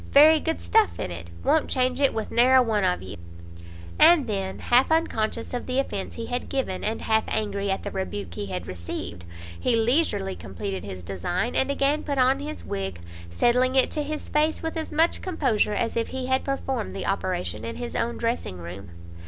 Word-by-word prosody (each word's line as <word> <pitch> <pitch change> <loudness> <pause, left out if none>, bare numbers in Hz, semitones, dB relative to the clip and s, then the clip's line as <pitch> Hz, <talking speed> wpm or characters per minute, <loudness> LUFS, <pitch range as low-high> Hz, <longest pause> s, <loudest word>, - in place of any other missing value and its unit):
very 310 +3 +8
good 325 +1 -2
stuff 445 -2 +2
in - - -3
it; 85 0 -7
won't 315 - +2
change 255 0 +1
it 275 - +4
with 220 -1 -4
ne'er 250 +2 +5
a 260 - +7
one 215 -4 +1
of 180 - +1
you!" 95 +1 -7 0.8
And 335 -6 +7
then, 195 -4 -3
half 245 +2 +3
unconscious 230 -9 0
of 245 - -3
the 255 0 -1
offence 235 -8 -2
he 230 - -5
had 245 +1 -3
given, 265 -9 -2
and 220 +2 -2
half 220 0 +2
angry 200 -2 -1
at 195 - -1
the - - -4
rebuke 100 - -4
he 100 +4 -4
had 90 -2 -4
received, 85 0 -6 0.3
he 245 - +2
leisurely 225 - +1
compleated 95 +2 -5
his 95 -2 -7
design, 100 - -2
and 265 - +2
again 280 +2 +1
put 285 -1 -3
on 260 +1 +4
his 300 +2 -6
wig, 95 -3 -4 0.3
settling 250 - +2
it 265 - +4
to 305 - 0
his 300 +1 -4
face 310 +2 +1
with 325 +1 -3
as 320 -1 -4
much 320 +2 +2
composure 265 - +1
as 230 +2 -1
if 230 -1 0
he 260 -1 -4
had 260 +1 +1
performed 270 -4 -2
the 195 - -4
operation 180 - -2
in 115 - -4
his 240 - -6
own 235 +1 -1
dressing 230 - -2
room. 90 +2 -8
230 Hz, 200 wpm, -25 LUFS, -, 0.8 s, very